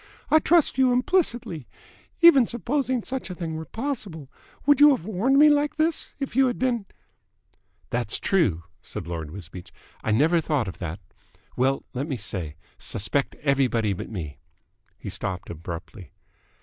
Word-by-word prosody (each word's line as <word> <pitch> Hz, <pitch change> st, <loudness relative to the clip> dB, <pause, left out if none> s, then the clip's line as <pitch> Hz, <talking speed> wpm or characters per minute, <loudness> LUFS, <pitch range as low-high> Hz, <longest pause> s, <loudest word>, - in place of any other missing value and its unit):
"I 315 Hz, -, +7 dB
trust 320 Hz, -4 st, +3 dB
you 260 Hz, -1 st, +5 dB
implicitly. 245 Hz, -, 0 dB, 0.5 s
Even 280 Hz, -9 st, +8 dB
supposing 255 Hz, 0 st, -1 dB
such 260 Hz, -5 st, -4 dB
a 180 Hz, -, -5 dB
thing 165 Hz, -2 st, -4 dB
were 160 Hz, 0 st, -5 dB
possible, 205 Hz, -, -5 dB, 0.3 s
would 290 Hz, -1 st, +5 dB
you 295 Hz, -, +10 dB
have 170 Hz, -, -9 dB
warned 220 Hz, +7 st, +1 dB
me 300 Hz, +2 st, +8 dB
like 295 Hz, 0 st, +2 dB
this, 315 Hz, +1 st, 0 dB
if 275 Hz, -4 st, -4 dB
you 265 Hz, 0 st, +5 dB
had 245 Hz, -, -2 dB
been 240 Hz, -6 st, -1 dB, 0.5 s
?" -, -, -41 dB
"That's 120 Hz, -3 st, 0 dB
true," 110 Hz, -, +1 dB, 0.2 s
said -, -, -7 dB
Lord 80 Hz, -3 st, -5 dB
Wisbeach. 90 Hz, 0 st, -10 dB, 0.3 s
"I -, -, -2 dB
never 155 Hz, +10 st, +3 dB
thought 145 Hz, -8 st, 0 dB
of 95 Hz, -, -7 dB
that. 90 Hz, +1 st, -5 dB, 0.6 s
Well, 135 Hz, +2 st, +1 dB
let 135 Hz, +4 st, -3 dB
me 135 Hz, -5 st, -3 dB
say, 90 Hz, -8 st, -3 dB, 0.2 s
suspect 135 Hz, +7 st, -1 dB
everybody 125 Hz, -7 st, +2 dB
but 90 Hz, -, -6 dB
me." 80 Hz, -10 st, -6 dB, 0.6 s
He -, -, -7 dB
stopped 95 Hz, -2 st, -3 dB
abruptly. 85 Hz, +4 st, -8 dB
160 Hz, 160 wpm, -25 LUFS, -, 0.6 s, you